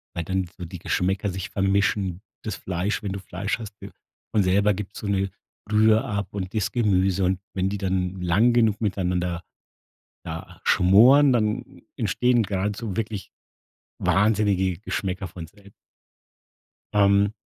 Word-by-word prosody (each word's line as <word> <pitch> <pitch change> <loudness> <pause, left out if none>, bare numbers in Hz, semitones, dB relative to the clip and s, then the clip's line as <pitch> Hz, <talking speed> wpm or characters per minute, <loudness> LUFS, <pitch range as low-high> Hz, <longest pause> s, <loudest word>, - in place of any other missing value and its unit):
weil 85 - -2
dann 95 +1 -1
so 90 - -6
die 90 +1 -8
Geschmäcker 95 +4 0
sich 95 0 -5
vermischen, 95 -1 0 0.2
das 110 -3 -3
Fleisch 95 +4 -2
wenn 100 - -3
du 100 - -4
Fleisch 95 +5 -3
hast 105 -3 -8
von 105 - -5
selber 100 +3 +3
gibt 100 +1 -7
so - - -7
'ne 100 -1 0 0.4
Brühe 110 +2 +4
ab 100 -7 -4
und 95 -2 -5
das 105 -3 0
Gemüse. 95 -5 +2
Und 95 0 +1
wenn 95 0 0
die 100 - -3
dann 95 -1 -2
lang 95 +8 +3
genug 110 -3 +2
miteinander 90 -4 -1 0.8
da 80 0 -7
schmoren, 125 +10 +6
dann 115 +1 -1 0.2
entstehen 120 +2 +2
grad 100 +1 -2
so 105 -4 -5
wirklich 105 -3 -4 0.7
wahnsinnige 100 -3 +2
Geschmäcker 95 -1 -3
von 85 -1 -8
sel 100 +3 -19 1.2
Ähm 100 0 +4
100 Hz, 145 wpm, -24 LUFS, 95-105 Hz, 1.2 s, schmoren